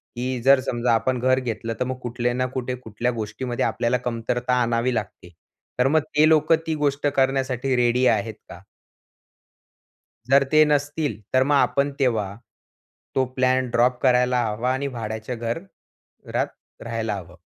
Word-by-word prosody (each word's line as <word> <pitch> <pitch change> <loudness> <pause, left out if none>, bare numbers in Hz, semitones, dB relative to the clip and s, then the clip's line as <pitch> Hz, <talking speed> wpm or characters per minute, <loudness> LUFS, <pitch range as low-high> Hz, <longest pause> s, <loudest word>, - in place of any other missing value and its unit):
की 125 0 -3
जर 135 0 +7
समजा 120 -2 0
आपण 125 +2 +1
घर 130 +1 +2
घेतलं, 115 -2 -4
तर 125 - 0
मग 130 0 -4
कुठल्या 120 0 -1
ना 130 +1 0
कुठे, 125 -1 -2
कुठल्या 120 0 -3
गोष्टीमध्ये 115 +2 -3
आपल्याला 120 +2 0
कमतरता 120 +1 -2
आणावी 120 +1 +1
लागते, 105 -5 -5 0.5
तर 125 - +4
मग 155 +3 +4 0.2
ते 150 +1 +6
लोकं 155 0 +4
ती 160 - 0
गोष्ट 145 -1 0
करण्यासाठी 135 -1 0
रेडी 125 +1 +2
आहेत 110 -1 +1
का? 90 - -10 1.7
जर 140 +1 +6
ते 155 0 +7
नसतील, 145 -2 -1
तर 130 0 +5
मग 145 +2 +2
आपण 140 0 +2
तेव्हा 110 -7 0 0.8
तो 130 - +3
प्लॅन 130 0 +2
ड्रॉप 125 +1 +2
करायला 125 -1 +3
हवा 115 +4 -1
आणि 140 +2 -2
भाड्याच्या 110 -1 -5
घर 115 +4 -3 0.7
घरात - - -1 0.4
राहायला 115 -2 -3
हवं. 90 -3 -9
125 Hz, 155 wpm, -23 LUFS, 115-135 Hz, 1.7 s, जर